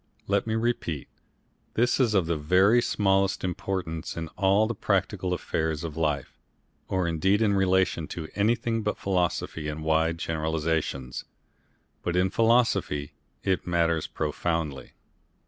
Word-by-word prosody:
Let 100 +3 +1
me 110 - 0
repeat; 115 - -2 0.7
this 120 +4 +2
is 115 -5 +3
of 95 -4 +3
the 85 0 0
very 95 +10 +4
smallest 95 -3 +1
importance 90 -3 -3
in 80 -1 -4
all 100 +4 +3
the 115 - -2
practical 95 -4 0
affairs 80 -3 -1
of 80 -3 -5
life, 75 -4 -2 0.5
or 95 -2 0
indeed 95 +5 +2
in 110 -2 +3
relation 95 -4 +2
to 80 -2 -6
anything 115 +2 +1
but 105 -1 -2
philosophy 90 -4 -1
and 75 +1 -4
wide 80 +1 +2
generalisations. 80 -5 -2 0.8
But 85 - -2
in 90 +1 +2
philosophy 115 -11 +2 0.3
it 95 -2 0
matters 85 -2 +1
profoundly. 75 -3 -2
90 Hz, 130 wpm, -27 LUFS, 80-100 Hz, 0.8 s, very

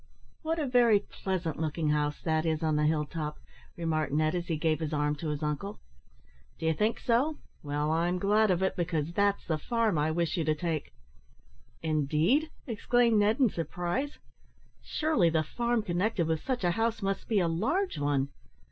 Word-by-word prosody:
"What 325 +1 -1
a 310 - 0
very 245 -4 +5
pleasant 185 -6 -3
looking 155 0 -1
house 150 0 0
that 160 -1 +1
is 160 -1 -1
on 155 -1 +2
the 150 0 +2
hill 155 -1 +1
top!" 150 -1 -5 0.4
remarked 160 -3 -1
Ned, 155 +2 +2
as 175 -1 -2
he 160 - -1
gave 155 -1 +1
his 160 -1 -3
arm 150 0 +1
to 155 +1 -4
his 150 0 -3
uncle. 150 +7 -3 0.8
"D'you 160 0 +1
think 210 +8 0
so? 270 +6 +1 0.2
Well, 145 +1 -1
I'm 170 +3 +1
glad 210 +3 +3
of 185 0 +2
it, 190 - +1
because 170 -2 -1
that's 200 +1 +1
the 160 -2 -1
farm 225 -2 +1
I 150 +1 +2
wish 170 +1 0
you 165 - +1
to 155 0 +2
take." 160 -1 -3 0.9
"Indeed!" 160 - +2 0.2
exclaimed 235 -1 +2
Ned, 210 +4 +2
in 250 - +5
surprise. 180 - -3 0.6
"Surely 300 - +1
the 160 -1 +1
farm 235 +7 -1
connected 180 0 0
with 160 -1 -1
such 255 -5 -2
a 175 - +3
house 225 +2 -1
must 195 0 -2
be 215 -3 +2
a 175 - +2
large 260 - 0
one?" 140 -1 +1
170 Hz, 185 wpm, -29 LUFS, 155-220 Hz, 0.9 s, very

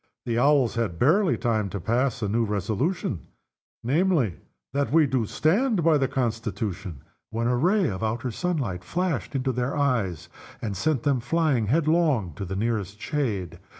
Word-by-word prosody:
The 115 -1 0
Owls 140 -2 +4
had 115 -8 -2
barely 170 - +3
time 110 -5 0
to 100 - -4
pass 120 +5 0
a - - +1
new 115 +4 +1
resolution, 110 - -2 0.6
namely, 140 - +2 0.4
"That 140 0 0
we 160 0 +5
do 130 -5 0
stand 200 - +1
by 160 -2 +4
the 135 - +2
Constitution," 105 - -3 0.3
when 115 +1 -2
a 125 +1 +2
ray 185 - +3
of 95 -6 -3
the 110 - 0
outer 120 +3 -3
sunlight 130 - -2
flashed 165 - -2
into 130 0 0
their 125 +3 -2
eyes, 115 - 0 0.3
and 105 -3 -4
sent 140 - 0
them 140 -3 +2
flying 135 -3 +1
headlong 155 - +2
to 100 - -4
the 95 +1 -4
nearest 105 -1 -2
shade. 110 - -2
120 Hz, 165 wpm, -25 LUFS, 105-150 Hz, 0.6 s, we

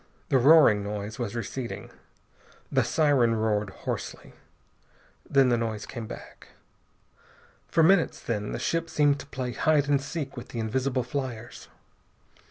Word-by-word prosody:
The 135 - +4
roaring 135 -7 +6
noise 105 +2 -5
was 120 -2 -3
receding. 120 +2 -5 0.8
The - - +3
siren 135 -7 +3
roared 105 -2 0
hoarsely. - - -6 1.0
Then 135 -2 +4
the 120 -1 +2
noise 110 -2 -3
came 115 -3 -7
back. - - -11 1.2
For 165 - +3
minutes, 180 +1 +4
then, 105 -3 -3
the - - -3
ship 165 0 -1
seemed 145 -1 +2
to 140 - -9
play 130 -3 -4
hide 145 +3 +2
and 140 -1 +2
seek 145 -1 -5
with 120 - -8
the 120 - -6
invisible 130 +3 -1
fliers. 120 -2 -5
125 Hz, 140 wpm, -27 LUFS, 110-145 Hz, 1.2 s, roaring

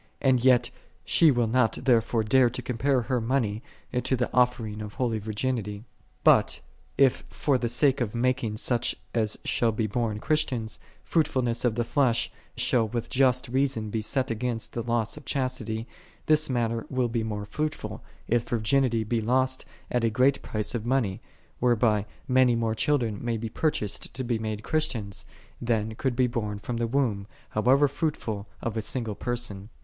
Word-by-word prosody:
And 130 -3 +3
yet 125 -2 +4 0.3
she 165 - +5
will 120 -4 +3
not 115 0 +2
therefore 115 -2 +2
dare 125 +3 +4
to 125 +2 -5
compare 125 +2 +1
her 125 +1 0
money 115 -3 0 0.4
to 130 - +1
the 125 -1 -1
offering1 115 -4 +1
of 105 -1 -7
holy 115 -4 0
virginity. 110 -1 -3 0.4
But - - +5 0.4
if 135 -2 +4
for 140 - 0
the 120 -1 -1
sake 130 +2 +2
of 115 -1 -2
mak 125 +2 +1
ing 110 -1 -2
such 120 +1 0 0.2
as 110 -3 0
shall 115 -1 +2
be 110 0 -1
born 110 0 -1
Christians, 125 -6 -1 0.2
fruitful 155 -5 +1
ness 115 -1 0
of 120 -3 +2
the 120 - +1
flesh 125 -1 +1 0.3
shall 120 -2 +2
with 120 +2 -4
just 130 -3 +3
reason 130 -4 0
be 110 - -1
set 130 +3 0
against 115 0 -3
the 120 - -2
loss 115 +1 -1
of 150 - -11
chastity, 120 -4 -2 0.4
this 155 -1 +3
matter 115 -2 -1
will 130 -2 +1
be 115 0 -1
more 105 -2 -3
fruitful, 150 +8 -4 0.2
if 120 0 +1
virginity 120 0 +2
be 115 +1 -1
lost 130 +3 +1 0.3
at 120 -1 +1
a 115 - +3
great 130 +5 +3
price 105 -1 -2
of 120 -3 -2
money, 120 -6 0 0.4
whereby 110 -4 +2 0.2
many 130 -2 +4
more 115 -1 0
children 115 -4 0
may 120 -1 -1
be 115 +1 -4
purchased 110 -6 -2
to 130 - -2
be 120 -2 -1
made 110 -1 -4
Christians, 115 -11 -2 0.4
than 110 -2 0
could 125 +2 -1
be 130 0 +3
born 110 -4 -2
from 115 +3 -4
the 115 0 0
womb, 115 -6 0 0.2
however 130 +6 +4
fruitful, 125 -9 -3 0.2
of 115 -1 -2
a 110 - 0
single 115 -1 -2
person. 115 -3 -4
120 Hz, 175 wpm, -27 LUFS, 110-130 Hz, 0.4 s, she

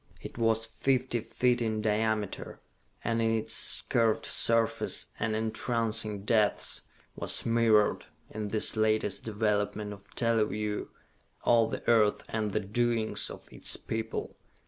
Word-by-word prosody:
It - - -8
was 115 -1 +1
fifty 130 +1 0
feet 125 +2 0
in 110 -2 -1
diameter, 110 -1 -1 0.4
and 115 0 0
in 115 0 +2
its 110 - +3
curved 115 -2 +2
surface 115 -1 +1
and 110 -1 -1
entrancing 110 -2 -1
depths 110 -2 +1 0.3
was - - +1
mirrored, 115 -2 +3 0.2
in 110 0 -4
this 105 +1 +1
latest 110 -2 +1
development 105 -1 -1
of 100 0 -15
teleview, 105 -2 0 0.6
all 115 -2 +4
the - - -6
earth 110 -3 +3
and 110 -2 -2
the 110 - 0
doings 115 +2 0
of - - -11
its - - 0
people. 110 0 -4
110 Hz, 125 wpm, -29 LUFS, 105-115 Hz, 0.6 s, all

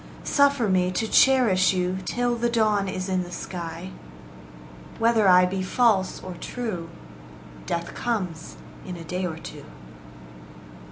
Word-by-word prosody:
Suffer 280 -5 +3
me 185 -2 +2
to 220 +4 -1
cherish 220 -9 +4
you 180 0 -1
Till 245 0 0
the 235 0 0
dawn 215 -4 +1
is 185 0 -4
in 185 -1 0
the 175 - -7
sky. 175 0 -6 1.1
Whether 225 -2 +3
I 180 0 +7
be 190 +1 -2
false 195 -1 +1
or 185 - -6
true, 205 -9 -5 0.8
Death 170 0 -3
comes 180 -9 -3 0.3
in 180 -1 -7
a 165 - -8
day 180 +3 -3
or 160 -2 -6
two. - - -10
190 Hz, 135 wpm, -25 LUFS, 180-230 Hz, 1.1 s, I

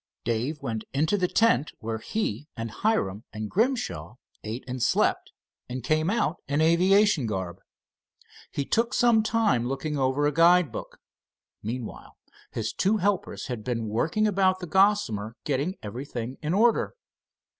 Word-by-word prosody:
Dave 120 +6 -2
went 110 -4 -3
into 155 +8 +2
the 185 -3 +1
tent 225 -7 +2
where 110 0 -4
he 145 - -3
and 115 -1 -4
Hiram 105 - 0
and 110 0 -5
Grimshaw 205 - -1 0.3
ate 110 +4 -5
and 130 0 -4
slept, - - +1 0.4
and 125 0 -5
came 155 +5 +1
out 200 -6 0
in 145 +1 0
aviation 180 - +4
garb. 95 -4 -4 0.9
He 140 - -2
took 230 - +1
some 235 -2 +5
time 215 - +1
looking 140 +3 -2
over 135 +2 +1
a 145 - +3
guide 170 -1 +5
book. - - -7 0.6
Meanwhile 115 +2 -6 0.3
his 110 -1 -3
two 205 +3 +2
helpers 200 -1 -1
had 125 -6 -5
been 115 -3 -2
working 155 - +1
about 190 -2 +3
the 185 - -6
Gossamer, 160 - +2
getting 145 +6 -1
everything 120 +2 -6
in 155 +4 -1
order. 230 - +3
145 Hz, 145 wpm, -26 LUFS, 115-195 Hz, 0.9 s, some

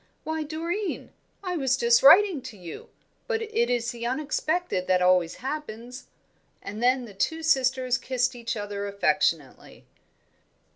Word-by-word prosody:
"Why, 315 0 -3
Doreen, 335 +6 -4 0.3
I 365 -2 -2
was 265 -3 +1
just 235 -1 +4
writing 350 +1 +7
to 240 -4 -10
you; 175 -3 -10 0.4
but 455 -2 -1
it 450 +2 0
is 240 -1 0
the 235 -1 -5
unexpected 305 - -1
that 185 -1 +3
always 180 -2 +3
happens." 250 -4 -6 0.6
And 210 +3 -7
then 250 +1 +2
the 210 - -12
two 320 +12 -2
sisters 255 -4 +2
kissed 250 -1 -1
each 235 -1 -4
other 205 -1 -4
affectionately. 185 -7 -1
250 Hz, 140 wpm, -26 LUFS, 210-315 Hz, 0.6 s, writing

